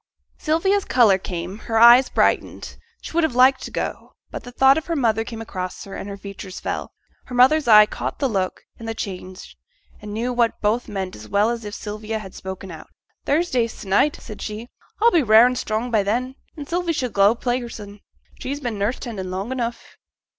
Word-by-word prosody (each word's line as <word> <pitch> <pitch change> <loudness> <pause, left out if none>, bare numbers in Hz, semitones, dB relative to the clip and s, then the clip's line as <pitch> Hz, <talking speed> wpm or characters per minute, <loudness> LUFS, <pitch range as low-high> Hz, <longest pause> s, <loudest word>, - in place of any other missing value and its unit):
Sylvia's 385 +6 +1
colour 220 - +4
came, 180 +2 -6
her 225 - +1
eyes 240 +3 +8
brightened, - - 0 0.3
she - - -7
would 340 +1 +2
have 315 -6 0
liked 260 +1 +5
to - - -6
go; - - -5 0.2
but - - -6
the 245 - -10
thought 270 +2 +5
of 320 - -4
her 335 - -1
mother 225 -6 +1
came 225 -1 -7
across 185 -4 -6
her, 195 - -9
and 200 - -6
her 200 - -7
features 195 -1 -9
fell. - - -4 0.3
Her 250 - -8
mother's 270 +3 +4
eye 215 -2 +9
caught - - -5
the 275 - 0
look 195 -6 -2 0.2
and 230 - -8
the 225 - -3
change, 185 -3 -7 0.5
and 210 0 -8
knew 235 +4 -2
what 235 -2 +1
both 220 +4 0
meant 190 -3 -4
as 105 - -12
well 205 +3 +2
as 230 -2 -5
if 205 - -6
Sylvia 215 +1 -5
had 195 -4 -9
spoken 190 0 -8
out. 160 - -11 0.4
'Thursday 280 -6 +1
se'nnight,' 210 +7 0
said 215 - -10
she. 220 +3 -6 0.3
'I'll 465 +2 +5
be 340 - +4
rare 220 -1 +7
and 250 0 +1
strong 225 +1 -2
by 220 -3 +3
then, 240 +6 -1 0.2
and 290 -2 -7
Sylvie 345 0 -1
shall 255 -6 -2
go 200 +3 +4
play 245 +1 -1
hersen; 210 -4 -9 0.4
she's 280 +2 -4
been 240 -7 -4
nurse 210 +5 0
tending 200 -7 -6
long 190 +6 -4
enough.' 240 -2 -5
225 Hz, 205 wpm, -22 LUFS, 200-255 Hz, 0.5 s, eye